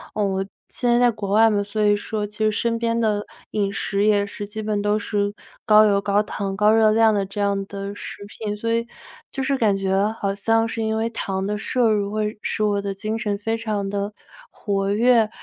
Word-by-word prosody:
我 195 -2 0 0.3
现 245 - -1
在 240 - +4
在 245 -1 +5
国 210 -3 -6
外 225 +2 +6
嘛， 205 -1 +1
所 205 +2 -3
以 205 0 +4
说 210 +1 -3
其 210 +1 -12
实 215 0 +3
身 230 +2 0
边 230 0 0
的 210 -2 +1 0.3
饮 200 -2 0
食 200 0 -1
也 205 -1 +3
是 205 0 -6
基 215 +1 -6
本 210 -1 -1
都 205 +1 +1
是 205 -1 -1 0.3
高 215 0 +7
油 200 -1 +3
高 205 0 +2
糖、 200 -2 -4
高 210 +1 +4
热 220 -1 +5
量 220 0 +4
的 200 -1 +1
这 195 +2 -7
样 200 -1 +1
的 200 0 -6
食 205 - -7
品， 210 0 -5
所 230 +2 -1
以， 230 0 0 0.5
就 270 - -3
是 275 +1 +1
感 210 -5 +2
觉 195 +2 +1
好 200 -1 -1
像 225 +3 +2
是 225 0 -3
因 220 0 0
为 225 +1 0
糖 195 -4 -3
的 210 0 -1
摄 235 +2 +1
入 205 -2 0
会 215 0 -2
使 215 - -1
我 205 -1 +1
的 200 0 -3
精 215 +3 -3
神 210 -3 -2
非 225 +2 -2
常 215 -3 -2
的 200 +1 -3 0.4
活 195 -1 -1
跃。 230 0 +4
210 Hz, 240 characters per minute, -22 LUFS, 200-220 Hz, 0.5 s, 高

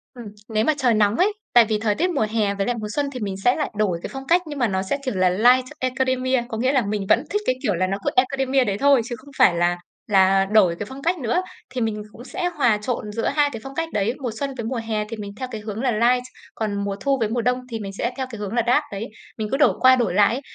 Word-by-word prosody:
Ừm, 240 -2 -9 0.2
nếu 215 0 +1
mà 310 - +3
trời 250 -4 +2
nóng 210 0 +3
ấy. 410 +3 +3 0.2
Tại 240 -2 +7
vì 215 -1 -1
thời 210 -2 0
tiết 360 +3 +1
mùa 275 -10 0
hè 210 -3 0
với 195 - -1
lại 245 - 0
mùa 210 - -4
xuân 285 -1 -1
thì 250 - -5
mình 200 -3 -3
sẽ 245 - +4
lại 300 - -2
đổi 195 -5 0
cái - - -4
phong 270 0 -7
cách 350 +1 +4
nhưng 290 -2 -6
mà 240 - +3
nó 190 -1 -1
sẽ, 195 +9 -2
kiểu, 255 - -2
là 185 -1 +3
Light 245 +7 +4
Academia. 255 -1 0
Có 220 - -4
nghĩa 255 +4 +1
là 260 -7 +2
mình 205 -1 -2
vẫn 240 - +4
thích 415 0 -1
cái 255 - +2
kiểu 205 -6 +1
là 185 +2 0
nó 195 +1 -2
cứ - - +3
Academia 265 +1 +2
đấy 200 -3 -1
thôi 275 -1 +4
chứ 240 -1 -5
không 275 +5 -16
phải 170 - +5
là 175 +1 +1 0.3
là 195 -1 +4
đổi 195 -4 +4
cái 205 - -3
phong 270 +1 -9
cách 345 +3 +1
nữa. 270 +9 0 0.3
Thì 255 -2 -4
mình 215 -2 -2
cũng 240 - -12
sẽ 355 +8 -3
hòa 235 -6 +3
trộn 210 -1 -4
giữa 230 +2 -2
hai 290 0 +2
cái 225 - -5
phong 270 0 -9
cách 330 0 -2
đấy. 210 +4 0
Mùa 245 -3 -2
xuân 275 -1 -2
với 230 - -4
mùa 245 0 -2
hè 215 -1 -1
thì 225 - -6
mình 205 -1 -6
theo 255 -1 -5
cái 215 -2 -5
hướng 215 +1 -5
là 255 -2 +1
Light. 245 +3 +2 0.3
Còn 205 -2 -2
mùa 200 -1 -2
thu 275 -1 +1
với 220 -2 0
mùa 240 +1 -1
đông 250 +2 +1
thì 225 - -3
mình 195 -2 -6
sẽ 235 - -1
theo 265 - -2
cái 225 -4 -8
hướng 205 +1 -4
là 240 - +2
Dark 270 +5 +4
đấy. 200 +3 -4 0.3
Mình 215 -1 -2
cứ 270 - +1
đổi 295 - +4
qua 260 0 +7
đổi 235 -8 0
lại 205 +3 +4
ấy, 275 - -5
235 Hz, 300 wpm, -22 LUFS, 210-260 Hz, 0.3 s, Tại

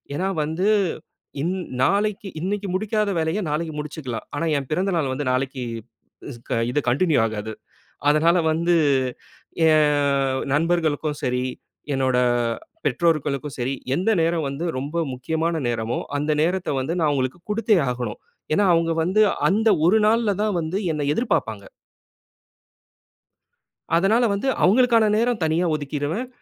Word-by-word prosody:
ஏன்னா 190 +5 -1
வந்து, 165 +7 0 0.7
இன் 180 +3 0 0.3
நாளைக்கு 205 - 0
இன்னைக்கு 200 +3 -2
முடிக்காத 210 +1 0
வேலையை 165 +6 -1
நாளைக்கு 155 +1 -2
முடிச்சுக்கலாம். 145 -6 -6
ஆனா 165 - -1
என் 135 - -9
பிறந்த 190 +5 0
நாள் 140 -5 0
வந்து 145 +2 -3
நாளைக்கு 130 0 -2 0.7
இஸ் 120 - -11 0.3
இது 145 - +1
கன்டின்யூ 155 +5 +2
ஆகாது. 110 0 -5 0.6
அதனால 165 +4 +4
வந்து, 170 +2 +1 1.0
என் 140 -3 +2
நண்பர்களுக்கும் 155 -2 0
சரி, 125 0 0 0.5
என்னோட 130 -1 +1 0.7
பெற்றோர்களுக்கும் 145 -1 0
சரி, 125 +3 -1 0.2
எந்த 185 +7 0
நேரம் 165 -1 +1
வந்து 145 +6 -4
ரொம்ப 155 +5 -2
முக்கியமான 160 +5 -2
நேரமோ, 115 0 -2 0.2
அந்த 150 +2 -1
நேரத்தை 180 +2 0
வந்து 135 +6 -2
நான் 155 -2 +2
அவங்களுக்கு 130 +2 -1
குடுத்தே 215 -1 +2
ஆகணும். 120 -4 -4 0.3
ஏன்னா, 205 +5 +3
அவங்க 165 0 +2
வந்து 190 +6 +2 0.3
அந்த 220 +3 +2 0.2
ஒரு 215 +6 +5
நாள்ல 220 -2 +2
தான் 210 -4 0
வந்து 165 +4 -2
என்னை 150 -1 -2
எதிர்பார்ப்பாங்க. 110 - -1 2.3
அதனால 205 +8 +3
வந்து 200 +7 -2 0.2
அவங்களுக்கான 230 +2 +4
நேரம் 235 -2 0
தனியா 160 +3 +1
ஒதுக்கீருவேன். 150 - -3
160 Hz, 125 wpm, -23 LUFS, 140-195 Hz, 2.3 s, ஒரு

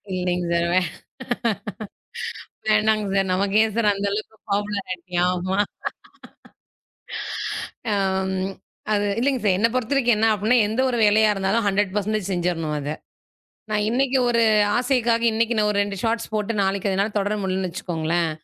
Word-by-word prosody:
இல்லைங்க 180 -1 -1
சார். 170 0 +2 0.8
வே 230 - +3 1.2
வேணாம்ங்க 215 -1 +3
sir. 195 -1 +1
நமக்கேன் 205 +3 +2
sir 230 -2 +3
அந்த 200 +1 -2
அளவுக்கு 215 +1 -4 0.2
பாப்புலருட்டி 195 -3 -3 0.2
ஆமா. 185 +2 -1 2.3
அம். 190 -1 0 0.4
அது 205 0 +1
இல்லைங்க 260 -2 +1
சார், 190 -3 +3
என்னப் 230 +4 +2
பொறுத்தவரைக்கும் 245 -1 +2
என்ன 225 - +4
அப்டின்னா, 215 +5 +2
எந்த 225 +4 -1
ஒரு 240 -2 -1
வேலையா 215 +1 +5
இருந்தாலும் 195 +3 0
100% 205 0 0
செஞ்சிரணும் 170 -4 -1
அத. 145 0 -4 0.8
நான் 210 -1 +1
இன்னைக்கு 265 +2 +2
ஒரு 235 -1 +3 0.4
ஆசைக்காக 240 -2 +1
இன்னைக்கு 230 +1 +1
நான் 210 -1 +3
ஒரு 205 - -2
2 200 -1 -5
ஷார்ட்ஸ் 225 0 -1
போட்டு, 215 +1 -1
நாளைக்கு 195 +1 0
எதனால 200 +2 0
தொடர 205 +1 0
முடியலன்னு 185 -1 -1
வச்சுக்கோங்களேன். 170 -1 -1
205 Hz, 135 wpm, -23 LUFS, 190-225 Hz, 2.3 s, வேலையா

